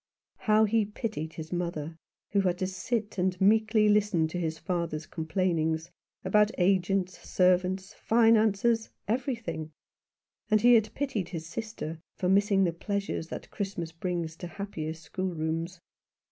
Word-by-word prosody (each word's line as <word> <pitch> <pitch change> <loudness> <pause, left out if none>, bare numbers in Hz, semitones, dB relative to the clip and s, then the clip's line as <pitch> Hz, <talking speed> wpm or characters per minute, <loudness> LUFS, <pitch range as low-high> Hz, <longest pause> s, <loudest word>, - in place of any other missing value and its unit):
How 215 0 +6
he 225 +2 +2
had 210 -1 -2
pitied 165 -9 -3
his 160 +1 -7
mother, 170 -3 -3 0.4
who 200 - +3
had 180 -2 +1
to 185 - -1
sit 200 +3 -3
and 180 0 0
meekly 215 +2 +4
listen 205 -6 +3
to 175 - -3
his 160 -2 -2
father's 170 -4 -2
complainings 160 0 -1 0.3
about 210 +2 +4
agents, 185 0 +1
servants, 185 +1 +1
finances, 225 0 +3 0.2
everything; 230 - -2 0.8
and 215 -1 +5
he 245 +2 +7
had 220 -2 +4
pitied 235 -11 -2
his 165 -3 -5
sister 175 -4 -5 0.2
for 180 - -1
missing 200 0 +4
the 170 -2 +1
pleasures 200 -1 -3
that - - -8
Christmas 185 -5 -4
brings 170 -1 -3
to 175 - -6
happier 160 -3 -5
schoolrooms. 165 0 -3
185 Hz, 140 wpm, -29 LUFS, 165-210 Hz, 0.8 s, he